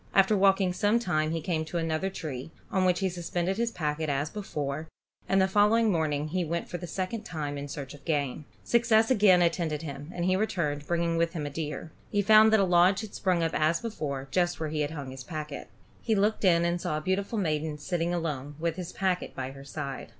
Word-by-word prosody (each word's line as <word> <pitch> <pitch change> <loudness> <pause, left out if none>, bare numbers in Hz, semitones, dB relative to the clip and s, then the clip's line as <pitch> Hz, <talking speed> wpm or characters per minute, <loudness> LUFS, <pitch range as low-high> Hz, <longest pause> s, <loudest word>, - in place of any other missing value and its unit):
After 195 +2 +5
walking 195 -1 +3
some 205 +5 +2
time 170 -9 0
he 165 0 -2
came 160 -1 -1
to 170 - -4
another 165 +3 -1
tree, 155 -8 -6 0.2
on 190 -1 +2
which 180 +1 +2
he 190 - +2
suspended 175 +1 -2
his 235 0 +1
packet, 155 -6 -2
as 145 +2 -1
before, 155 -7 -4 0.4
and 195 - +4
the 190 - +4
following 210 +3 +4
morning 155 -3 0 0.2
went 170 0 -2
for 175 - -5
the 175 - -6
second 190 +6 -3
time 150 -8 -4
in 140 0 -5
search 140 -1 -6
of 145 -1 -14
game. 145 -1 -1 0.2
Success 230 -1 +3
again 195 -6 +6
attended 165 -3 0
him, 145 0 -7
and 175 -1 -3
he 185 0 +3
returned, 150 -8 -1
bringing 170 -1 0
with 165 0 +1
him 155 -4 -3
a 145 - -4
deer. 150 +1 -5 0.2
He 205 -1 +1
found 215 +1 +7
that 220 - +5
a - - +4
lodge 180 +1 +4
had 215 -2 -8
sprung 180 -3 +1
up 165 - 0
as 155 +2 +2
before, 145 - -4
just 175 +1 +1
where 160 -1 -2
he 150 0 -1
had 145 - 0
hung 145 -4 -6
his 130 -1 -8
packet. 150 -2 -6 0.3
He 225 - +1
looked 210 +2 +1
in 170 -3 +4
and 170 0 0
saw 155 - -1
a - - -3
beautiful 195 +6 -1
maiden 155 -5 -1
sitting 170 +2 -1
alone, 150 -5 -3
with 165 0 -1
his 180 -1 -5
packet 185 -2 -1
by 130 0 -4
her 135 0 -11
side. 140 -1 -5
170 Hz, 225 wpm, -28 LUFS, 150-190 Hz, 0.4 s, found